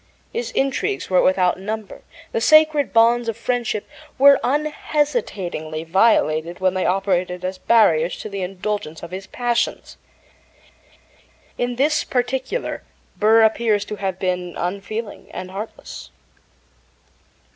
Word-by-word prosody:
His 470 +2 -3
intrigues 275 - -1
were 185 - +5
without 185 -1 +2
number; 215 +1 -6 0.3
the 225 - -1
sacred 310 +1 +5
bonds 230 +1 +4
of 225 - -4
friendship 235 -3 -2 0.3
were 280 +1 +7
unhesitatingly 245 - -2
violated 165 -3 +2
when 185 -1 +2
they 185 -1 0
operated 180 -1 0
as 185 0 -4
barriers 175 -8 +3
to - - -7
the 200 -2 -5
indulgence 185 -3 -4
of 170 - -8
his 190 +2 -7
passions. 240 -1 -2 1.6
In 245 0 -2
this 300 +5 +2
particular 260 - -2 0.3
Burr 220 +2 +5
appears 220 -2 +2
to 210 - -6
have 190 -2 -3
been 180 -2 -2
unfeeling 200 +4 -5
and 185 0 -6
heartless. 205 +4 -8
210 Hz, 120 wpm, -21 LUFS, 185-245 Hz, 1.6 s, were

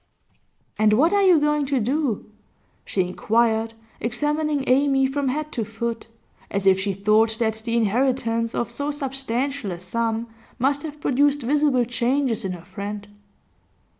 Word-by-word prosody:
'And 215 0 +4
what 315 - +4
are 405 - +4
you 365 -4 +6
going 300 -1 +1
to 270 -1 +1
do?' 255 0 -1 0.6
she 190 - 0
inquired, 225 +4 +1 0.2
examining 295 +4 0
Amy 270 +1 +3
from 275 +1 -1
head 305 +4 -2
to 230 - -2
foot, 225 +2 -4 0.4
as 195 -1 -2
if 190 -1 +5
she 200 +1 -1
thought 215 +3 +2
that 220 -1 -1
the 230 0 0
inheritance 230 0 0
of 235 - -1
so 285 +5 -3
substantial 270 -3 -2
a 175 - -4
sum 225 +5 -2 0.3
must 275 +3 +1
have 300 -2 -7
produced 285 +1 +2
visible 275 -1 +2
changes 245 0 0
in 190 -1 -2
her 175 -1 -10
friend. 200 +2 -6
240 Hz, 150 wpm, -23 LUFS, 220-285 Hz, 0.6 s, you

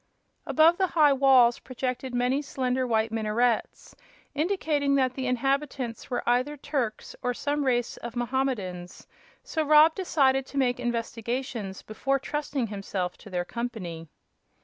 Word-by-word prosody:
Above 330 +3 +4
the 380 - +3
high 295 -3 +6
walls 260 -3 +5
projected 255 0 -4
many 250 +3 +1
slender, 255 -2 -1
white 220 -1 +1
minarets, 225 +1 -1 0.4
indicating 300 -3 +1
that 260 -2 +2
the 260 0 -3
inhabitants 260 -2 -1
were 245 - -3
either 255 +5 +1
Turks 265 -6 -3
or 245 0 -1
some 290 +2 -1
race 245 -3 0
of 235 0 -8
Mohammedans; 240 -8 -3 0.4
so 320 - -2
Rob 305 +1 +6
decided 270 -8 +1
to 280 - -8
make 250 -2 +1
investigations 235 -3 -3
before 270 +5 -1
trusting 285 -1 -3
himself 195 -3 -4
to 210 - -12
their 180 -2 -2
company. 185 -9 -5
255 Hz, 135 wpm, -27 LUFS, 230-280 Hz, 0.4 s, high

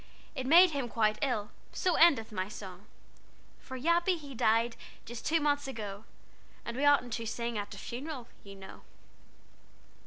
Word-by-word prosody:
It 260 -4 -4
made 345 +4 +7
him 275 -4 -2
quite 215 -2 +1
ill, 230 -7 -1 0.2
So 365 - +1
endeth 280 -12 +4
my 185 -1 -3
song. 195 -2 -10 0.7
"For 260 - -8
Yappy 340 +6 +2
he 285 -3 -10
died 230 0 +2 0.3
Just 235 -1 -7
two 330 +1 +3
months 290 -1 0
ago, 210 -5 -6 0.6
And 235 - -5
we 270 - -2
oughtn't 275 -5 +4
to 230 - -3
sing 235 +1 -3
At 205 -1 -4
a - - -11
funeral, 255 +3 -6 0.2
you 200 -1 -11
know." 190 -1 -12
240 Hz, 160 wpm, -31 LUFS, 215-290 Hz, 0.7 s, made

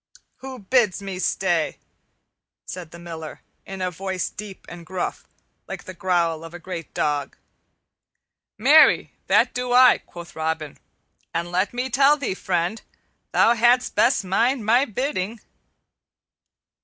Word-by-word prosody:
"Who 265 0 -8
bids 215 -2 +1
me 195 -2 -6
stay?" 175 -4 0 0.9
said 180 -3 -7
the 170 - -12
Miller 165 -2 -8 0.3
in 190 -1 -5
a 180 - -1
voice 190 +1 -3
deep 205 -2 -9
and 175 -1 -10
gruff, 180 +1 -4 0.4
like - - -7
the 185 - -9
growl 170 -3 0
of 165 +1 -10
a - - -8
great 170 -2 -7
dog. 145 -2 -1 1.2
"Marry, 285 +8 +5 0.2
that - - +3
do 250 0 -2
I," 255 0 +7
quoth 175 +2 -12
Robin; 160 -2 -3 0.6
"and 170 +1 -2
let 185 +3 0
me 250 +1 -2
tell 275 +4 +5
thee, 275 -9 -2
friend, 180 +3 -2 0.5
thou 235 - +5
hadst 240 +2 +3
best 245 -2 +3
mind 230 +5 +1
my 240 +5 +4
bidding." 225 -3 -3
190 Hz, 135 wpm, -23 LUFS, 170-240 Hz, 1.2 s, I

